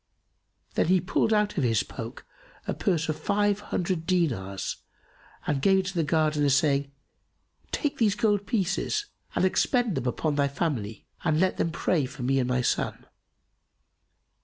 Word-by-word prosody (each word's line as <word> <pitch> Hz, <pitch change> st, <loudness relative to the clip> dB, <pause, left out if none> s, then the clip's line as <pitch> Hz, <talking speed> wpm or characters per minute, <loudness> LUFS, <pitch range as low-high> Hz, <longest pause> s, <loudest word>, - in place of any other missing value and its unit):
Then -, -, +2 dB
he 185 Hz, +1 st, +4 dB
pulled 185 Hz, +4 st, +1 dB
out 210 Hz, -4 st, +2 dB
of -, -, +1 dB
his 115 Hz, -4 st, +2 dB
poke 115 Hz, +3 st, -8 dB, 0.4 s
a -, -, 0 dB
purse 170 Hz, -6 st, 0 dB
of 155 Hz, -1 st, -2 dB
five 205 Hz, 0 st, +1 dB
hundred 180 Hz, -4 st, -2 dB
dinars 115 Hz, -, 0 dB, 0.7 s
and 140 Hz, -2 st, 0 dB
gave 195 Hz, +5 st, +5 dB
it 190 Hz, -, +1 dB
to -, -, -7 dB
the 170 Hz, -3 st, +1 dB
Gardener, 150 Hz, -2 st, +2 dB
saying, 140 Hz, 0 st, +2 dB, 0.8 s
"Take 295 Hz, -3 st, -1 dB
these 210 Hz, -4 st, +3 dB
gold 205 Hz, -1 st, +1 dB
pieces 200 Hz, -, 0 dB, 0.3 s
and -, -, +3 dB
expend 240 Hz, +3 st, +2 dB
them 125 Hz, -, -2 dB
upon 150 Hz, +5 st, 0 dB
thy 140 Hz, -1 st, +2 dB
family 130 Hz, -, -3 dB, 0.2 s
and 160 Hz, -2 st, +2 dB
let 185 Hz, +1 st, +2 dB
them -, -, +1 dB
pray 160 Hz, -3 st, 0 dB
for 130 Hz, 0 st, -8 dB
me 135 Hz, +2 st, +2 dB
and 125 Hz, -1 st, 0 dB
for 125 Hz, -, +1 dB
this 125 Hz, 0 st, +2 dB
my -, -, 0 dB
son." -, -, -11 dB
160 Hz, 170 wpm, -27 LUFS, 140-195 Hz, 0.8 s, gave